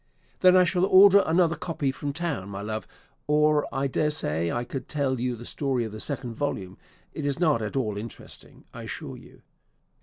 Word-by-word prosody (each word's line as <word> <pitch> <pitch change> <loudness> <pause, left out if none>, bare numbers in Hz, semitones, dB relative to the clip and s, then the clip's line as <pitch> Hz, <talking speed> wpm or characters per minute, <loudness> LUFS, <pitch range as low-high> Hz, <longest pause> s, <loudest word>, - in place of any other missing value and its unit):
"Then 185 0 +6
I 185 - +7
shall 180 0 +1
order 200 +1 +7
another 170 0 +3
copy 155 -4 -2
from 145 +1 -4
town, 145 - -4
my 100 0 -6
love; 110 +1 -4 0.4
or 150 0 +3
I 135 +1 -1
daresay 125 - 0
I 120 - -2
could 130 +1 -6
tell 135 -4 -1
you 125 0 -1
the 120 +1 -10
story 135 -3 -1
of 110 - -6
the 110 - -8
second 125 -2 -4
volume: 100 -8 -4 0.3
it 155 - -5
is 140 0 -1
not 155 -9 +2
at 110 +3 -4
all 110 -6 -1
interesting, 115 +1 -10
I - - -8
assure - - -6
you. - - -16
140 Hz, 190 wpm, -26 LUFS, 115-155 Hz, 0.4 s, I